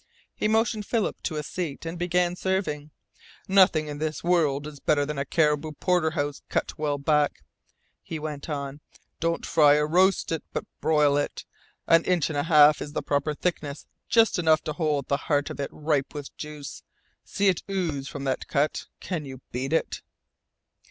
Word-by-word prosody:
He - - -1
motioned 220 -1 +1
Philip 225 -4 -1
to 160 - -3
a 150 - -2
seat, 165 -1 -5
and 165 +1 -5
began 175 0 +1
serving. 180 -6 -2 0.6
"Nothing 185 -5 +5
in 145 -1 -6
the 155 0 -2
world 155 -5 +2
is 150 -2 -9
better 145 0 +2
than 150 -1 -4
a 140 - -1
caribou 150 +1 +1
porterhouse 160 -4 0
cut - - -1
well 145 -2 0
back," 150 +1 +1 0.6
he 165 - -6
went 150 -1 -6
on. 140 -1 -4 0.4
"Don't 170 0 -1
fry 145 -2 +5
or 150 0 +2
roast 185 +4 +3
it, 165 - -2
but - - -3
broil 150 -2 +3
it. 145 - -3 0.4
An 165 0 +5
inch 175 -4 +1
and 145 - -3
a 160 - -2
half 150 -2 +7
is 145 - -6
the - - -2
proper 145 +1 0
thickness, 150 -4 -3 0.2
just 225 -5 +4
enough 160 -2 +3
to 155 - -3
hold 150 -5 -1
the 140 - +1
heart 145 -1 +1
of - - -8
it 140 - -2
ripe 150 -2 -1
with 145 -1 -7
juice. 150 -2 -8 0.4
See 200 - 0
it 185 -4 +2
ooze 165 -8 -2
from 140 -1 -6
that 135 -1 -2
cut! 150 0 0
Can 170 -5 -3
you 130 -1 -9
beat 130 +3 -3
it?" 165 - 0
150 Hz, 180 wpm, -26 LUFS, 145-170 Hz, 0.6 s, half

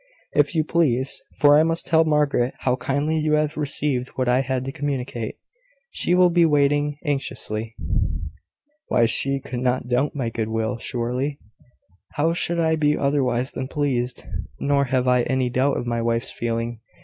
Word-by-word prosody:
"If 185 - +2
you 160 - +3
please; 140 -5 0 0.2
for 145 0 +6
I - - +6
must 165 +1 0
tell 160 0 +4
Margaret 145 -5 +1
how 125 -1 +2
kindly 145 +5 -1
you 155 0 +1
have 150 0 +1
received 140 -3 -1
what 130 -1 -1
I 125 +1 +3
had 130 -1 -1
to 135 - -3
communicate. 130 -5 -3 0.6
She 180 - +1
will 180 -1 +5
be 170 0 +4
waiting 145 -1 +2
anxiously." 115 -6 -3 1.1
"Why, 120 - +3
she 135 +4 +2
could 125 -2 -6
not 125 0 0
doubt 130 +5 +1
my 125 -5 -2
good 110 -1 -2
will, 110 +1 -2
surely? 125 +5 -2 0.8
How 160 +3 +1
should 170 0 0
I 160 -1 +2
be 150 -1 +2
otherwise 130 -3 0
than 130 - -4
pleased? 130 -4 -1 0.3
Nor 140 0 +2
have 130 -1 0
I 125 0 +4
any 130 0 0
doubt 130 +3 +1
of - - -3
my 120 -1 -1
wife's 115 0 0
feeling. 115 0 -3
135 Hz, 170 wpm, -23 LUFS, 125-150 Hz, 1.1 s, for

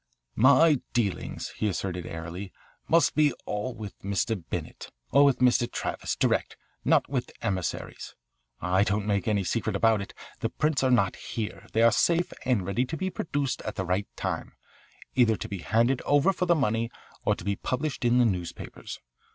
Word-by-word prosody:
"My 140 +4 +5
dealings," 110 -6 -1
he 110 - 0
asserted 90 -2 -3
airily, 85 +4 -6 0.4
"must 165 -2 +4 0.3
all 105 +5 -3
be - - -14
with 105 -3 -8
Mr. 100 0 -1
Bennett, - - -5 0.2
or 140 - +6
with 140 -2 +4
Mr. 120 -1 +3
Travis, - - -3
direct, - - 0 0.3
not - - +3
with - - -2
emissaries. 95 -3 -3 0.4
I 95 +2 +2
don't 105 0 0
make 105 +2 0
any 105 -2 +2
secret 90 - -1
about 110 -2 +3
it. 100 - -8 0.2
The - - -1
prints 155 -2 0
are 130 - +3
not 100 -7 +3
here. 105 -4 -5
They 115 - +3
are 115 - +7
safe 170 +11 +2
and 120 -8 +1
ready 100 +7 0
to 160 +5 -5
be 190 +4 -2
produced 145 -6 -2
at 110 - -5
the 95 - -2
right 90 +3 0
time, - - -3 0.6
either 120 -3 +4
to - - -6
be 100 - -5
handed 115 - +2
over 145 +7 +3
for 180 0 -1
the 170 - +5
money 115 -5 0 0.3
or - - +2
to - - -10
be 100 0 0
published 135 +7 -3
in 120 0 +4
the 125 - +5
newspapers. 90 -6 -4
115 Hz, 180 wpm, -27 LUFS, 100-130 Hz, 0.6 s, are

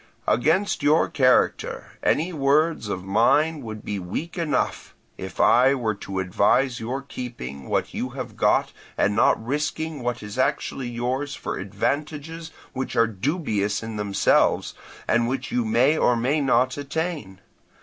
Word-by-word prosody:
Against 160 - +2
your 150 +3 +4
character 130 -3 +1
any 170 +4 +1
words 150 -3 +2
of 95 -2 -3
mine 145 +10 +2
would 110 -3 -8
be 100 -1 -3
weak 100 - -5
enough, 150 -7 -2 0.2
if - - -8
I 130 +3 +5
were 115 -5 -1
to 100 -1 -7
advise 105 +7 +2
your 130 +5 -4
keeping 115 - -7
what - - -1
you 125 - -3
have 130 -2 -6
got - - +2 0.2
and 105 - +2
not 110 0 +3
risking 150 +2 -2
what 120 -2 -3
is 105 +4 -7
actually 130 -1 -1
yours 125 +4 -2
for - - -5
advantages 150 - -3 0.2
which 130 0 -4
are 115 - +5
dubious 110 - -1
in 110 -1 -5
themselves, 100 -1 +2 0.3
and 120 0 +2
which 130 +1 -3
you 125 - +1
may 125 +8 +3
or 125 - +3
may 130 +6 +1
not 130 -1 +2
attain. 145 - -4
125 Hz, 150 wpm, -24 LUFS, 110-145 Hz, 0.3 s, I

